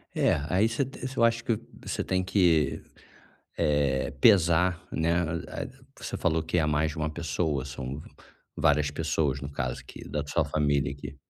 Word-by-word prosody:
É, -, -, +3 dB
aí 95 Hz, +5 st, +3 dB
ce 115 Hz, +4 st, 0 dB
você 130 Hz, 0 st, -6 dB
eu 115 Hz, -, +4 dB
acho 115 Hz, 0 st, +3 dB
que 115 Hz, -3 st, 0 dB, 0.3 s
você -, -, -2 dB
tem 95 Hz, 0 st, 0 dB
que, 85 Hz, -7 st, +2 dB, 0.8 s
eh, 75 Hz, -4 st, +1 dB
pesar, 90 Hz, -3 st, +5 dB
né, 85 Hz, +1 st, +1 dB
a 85 Hz, 0 st, -4 dB
a -, -, -5 dB, 0.3 s
você -, -, -5 dB
falou 80 Hz, -1 st, +1 dB
que 80 Hz, +3 st, -1 dB
é 80 Hz, -, +2 dB
mais 75 Hz, +1 st, +1 dB
de 80 Hz, -, -9 dB
uma 75 Hz, 0 st, -1 dB
pessoa, 75 Hz, -3 st, -1 dB
são 65 Hz, +1 st, -6 dB, 0.5 s
várias 75 Hz, 0 st, +3 dB
pessoas, 70 Hz, -2 st, 0 dB
no 70 Hz, -, -6 dB
caso, 65 Hz, -4 st, -3 dB
que, -, -, -11 dB
da 75 Hz, -, -2 dB
sua 80 Hz, +2 st, +1 dB
família, 70 Hz, -1 st, +1 dB
que 70 Hz, 0 st, -9 dB
80 Hz, 175 wpm, -28 LUFS, 70-90 Hz, 0.8 s, pesar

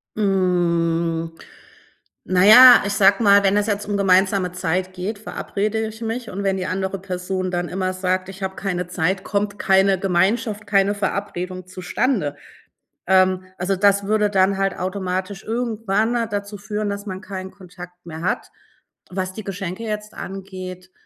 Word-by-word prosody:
Hm, 170 Hz, -4 st, 0 dB, 0.9 s
na 185 Hz, 0 st, +2 dB
ja, 250 Hz, +4 st, +10 dB
ich 200 Hz, -, -1 dB
sage 200 Hz, +2 st, +4 dB
mal, 200 Hz, 0 st, +6 dB
wenn 195 Hz, 0 st, +3 dB
es 210 Hz, +1 st, +1 dB
jetzt 205 Hz, -1 st, -2 dB
um 205 Hz, -, -1 dB
gemeinsame 190 Hz, -1 st, +3 dB
Zeit 185 Hz, +1 st, -2 dB
geht, 195 Hz, +4 st, -5 dB
verabrede 215 Hz, +1 st, -3 dB
ich 220 Hz, +1 st, -10 dB
mich 230 Hz, +1 st, -4 dB
und 200 Hz, +1 st, -5 dB
wenn 195 Hz, -1 st, +1 dB
die 185 Hz, -, -3 dB
andere 190 Hz, +1 st, -2 dB
Person 185 Hz, 0 st, -3 dB
dann 175 Hz, -1 st, -2 dB
immer 185 Hz, 0 st, -2 dB
sagt: 185 Hz, 0 st, -1 dB
„Ich 195 Hz, 0 st, -9 dB
habe 190 Hz, 0 st, -3 dB
keine 180 Hz, -3 st, -3 dB
Zeit“, 185 Hz, +2 st, -1 dB
kommt 205 Hz, 0 st, -2 dB
keine 190 Hz, -1 st, +3 dB
Gemeinschaft, 205 Hz, +3 st, 0 dB
keine 200 Hz, 0 st, +3 dB
Verabredung 185 Hz, -2 st, -4 dB
zustande, 185 Hz, -, -1 dB, 0.7 s
ähm, 185 Hz, 0 st, +3 dB
also 190 Hz, +2 st, 0 dB
das 200 Hz, +1 st, +3 dB
würde 210 Hz, 0 st, +2 dB
dann 195 Hz, -1 st, +2 dB
halt 195 Hz, -1 st, -1 dB
automatisch 185 Hz, +1 st, -3 dB
irgendwann 225 Hz, -1 st, -1 dB, 0.2 s
dazu 205 Hz, 0 st, -4 dB
führen, 210 Hz, +1 st, -3 dB
dass 200 Hz, 0 st, -5 dB
man 190 Hz, -1 st, -6 dB
keinen 190 Hz, -1 st, -7 dB
Kontakt 180 Hz, -1 st, -13 dB
mehr 160 Hz, -1 st, -8 dB
hat. 180 Hz, -, -2 dB, 0.6 s
Was 185 Hz, 0 st, -3 dB
die 215 Hz, -, -7 dB
Geschenke 195 Hz, +2 st, -5 dB
jetzt 210 Hz, -1 st, -5 dB
angeht 185 Hz, -1 st, -8 dB
195 Hz, 155 wpm, -21 LUFS, 185-205 Hz, 0.9 s, ja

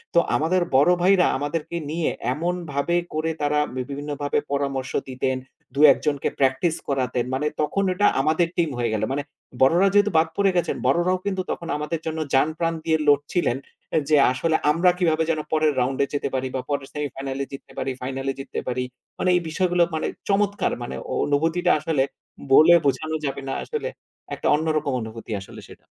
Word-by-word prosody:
তো -, -, +8 dB, 0.2 s
আমাদের 175 Hz, +4 st, +2 dB, 0.2 s
বড় 145 Hz, +6 st, +5 dB
ভাইরা 185 Hz, 0 st, +5 dB
আমাদেরকে 150 Hz, +4 st, -3 dB
নিয়ে 165 Hz, 0 st, 0 dB, 0.2 s
এমনভাবে 170 Hz, 0 st, -2 dB, 0.2 s
করে 155 Hz, +1 st, -1 dB
তারা 145 Hz, 0 st, +2 dB, 0.3 s
বিভিন্নভাবে 145 Hz, 0 st, -3 dB
পরামর্শ 140 Hz, -2 st, -2 dB, 0.2 s
দিতেন। 130 Hz, 0 st, -1 dB, 0.4 s
২ -, -, -2 dB
একজনকে 145 Hz, 0 st, -1 dB
প্র্যাকটিস 135 Hz, +5 st, +2 dB
করাতেন। 130 Hz, -3 st, 0 dB
মানে 140 Hz, +3 st, 0 dB
তখন 155 Hz, +7 st, 0 dB
ওটা 205 Hz, +3 st, +3 dB
আমাদের 160 Hz, +4 st, +2 dB
টিম 170 Hz, -2 st, +2 dB
হয়ে 120 Hz, -2 st, 0 dB
গেলো। 110 Hz, 0 st, 0 dB
মানে 145 Hz, +1 st, -2 dB, 0.4 s
বড়রা 170 Hz, +9 st, +5 dB
যেহেতু 205 Hz, 0 st, +4 dB
বাদ 160 Hz, +1 st, +4 dB
পড়ে 200 Hz, -1 st, +3 dB
গেছেন 175 Hz, -, 0 dB
বড়রাও 180 Hz, +2 st, +2 dB
কিন্তু 190 Hz, -2 st, -1 dB, 0.4 s
আমাদের 150 Hz, +2 st, -3 dB
জন্য 160 Hz, 0 st, -3 dB, 0.2 s
জানপ্রাণ 160 Hz, +4 st, +1 dB
দিয়ে 160 Hz, -1 st, +3 dB
লড়ছিলেন 145 Hz, -1 st, +2 dB, 0.5 s
যে 155 Hz, -, +5 dB, 0.2 s
আসলে 160 Hz, +5 st, 0 dB, 0.2 s
আমরা 170 Hz, +4 st, +4 dB
কিভাবে 165 Hz, -3 st, +2 dB
যেন 155 Hz, -, -1 dB
পরের 155 Hz, -1 st, +3 dB
রাউন্ডে 130 Hz, +2 st, +1 dB
যেতে 145 Hz, -, -1 dB
পারি 130 Hz, 0 st, -1 dB
বা 130 Hz, -, -1 dB
পরের 140 Hz, -2 st, -2 dB
সেমিফাইনাল 135 Hz, -2 st, -4 dB
এ -, -, -5 dB
জিততে 135 Hz, -, -10 dB
পারি, 135 Hz, -, -1 dB
ফাইনাল 135 Hz, +1 st, -4 dB
এ -, -, -5 dB
জিততে 135 Hz, -1 st, -5 dB
পারি। 125 Hz, 0 st, -1 dB, 0.4 s
মানে 185 Hz, -, +1 dB
এই -, -, -1 dB
বিষয়গুলো 175 Hz, +1 st, +2 dB
মানে 155 Hz, -, -1 dB, 0.2 s
চমৎকার 200 Hz, 0 st, +1 dB
মানে 120 Hz, -, -5 dB, 0.3 s
অনুভূতিটা 165 Hz, +5 st, +1 dB
আসলে 155 Hz, -3 st, +1 dB, 0.5 s
বলে 155 Hz, +5 st, +8 dB
বোঝানো 155 Hz, +3 st, 0 dB
যাবে 140 Hz, 0 st, -3 dB
না -, -, -1 dB
আসলে 460 Hz, +1 st, -3 dB, 0.5 s
একটা -, -, -3 dB
অন্যরকম 155 Hz, -2 st, 0 dB
অনুভূতি 110 Hz, +1 st, -8 dB, 0.2 s
আসলে -, -, -10 dB
সেটা। -, -, -15 dB
150 Hz, 170 wpm, -23 LUFS, 135-170 Hz, 0.5 s, তো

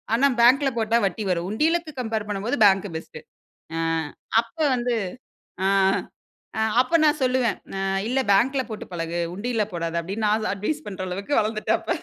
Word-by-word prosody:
ஆனா 270 Hz, +4 st, +4 dB
பேங்க்ல 270 Hz, +3 st, +5 dB
போட்டா 225 Hz, +1 st, +2 dB
வட்டி 200 Hz, +3 st, -4 dB
வரும். 175 Hz, 0 st, -1 dB
உண்டியலுக்கு 320 Hz, +6 st, 0 dB
கம்பேர் 220 Hz, -3 st, -3 dB
பண்ணும்போது 205 Hz, +7 st, -2 dB
பேங்க் 195 Hz, 0 st, +4 dB
பெஸ்ட் 160 Hz, -, -10 dB, 0.6 s
ஆ, -, -, -1 dB, 0.6 s
அப்ப 230 Hz, 0 st, -4 dB, 0.2 s
வந்து, 245 Hz, 0 st, 0 dB, 0.7 s
ஆ -, -, +3 dB, 1.1 s
அப்ப 255 Hz, +6 st, 0 dB
நான் 300 Hz, 0 st, +3 dB
சொல்லுவேன். 255 Hz, -3 st, +1 dB, 0.2 s
ஆ -, -, -2 dB, 0.3 s
இல்ல 260 Hz, +2 st, +1 dB
பேங்க்ல 260 Hz, +7 st, +3 dB
போட்டு 215 Hz, -, -6 dB
பழகு. 170 Hz, 0 st, -3 dB
உண்டியல்ல 225 Hz, +2 st, -1 dB
போடாத 165 Hz, -1 st, -3 dB
அப்படினு 195 Hz, +6 st, -4 dB
நான் 215 Hz, +1 st, +1 dB
அட்வைஸ் 290 Hz, +11 st, -3 dB
பண்ற 190 Hz, -2 st, -5 dB
அளவுக்கு 195 Hz, +8 st, -5 dB
வளர்ந்துட்டேன் 215 Hz, 0 st, 0 dB
அப்ப. -, -, -2 dB
220 Hz, 155 wpm, -24 LUFS, 195-255 Hz, 1.1 s, பேங்க்ல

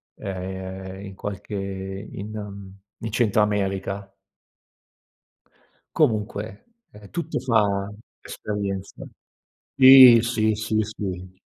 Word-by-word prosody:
ehm, 95 Hz, 0 st, -6 dB
in 100 Hz, -, -9 dB
qualche 100 Hz, +1 st, -7 dB
in, 95 Hz, +1 st, -6 dB
mhmm, 100 Hz, -2 st, -8 dB, 0.3 s
in 115 Hz, -, -4 dB
centro 110 Hz, -2 st, +2 dB
America. 100 Hz, -1 st, -2 dB, 1.8 s
Comunque, 105 Hz, -6 st, -1 dB, 0.3 s
ehm, 105 Hz, -1 st, -14 dB
tutto 170 Hz, -1 st, -3 dB
fa 105 Hz, -5 st, +1 dB, 0.3 s
esperienza. 100 Hz, -2 st, -5 dB, 0.7 s
Sì, 130 Hz, -3 st, +10 dB
sì, 110 Hz, -2 st, +1 dB
sì, 110 Hz, +1 st, -2 dB
sì. 95 Hz, -3 st, -6 dB
100 Hz, 90 wpm, -23 LUFS, 95-110 Hz, 1.8 s, Sì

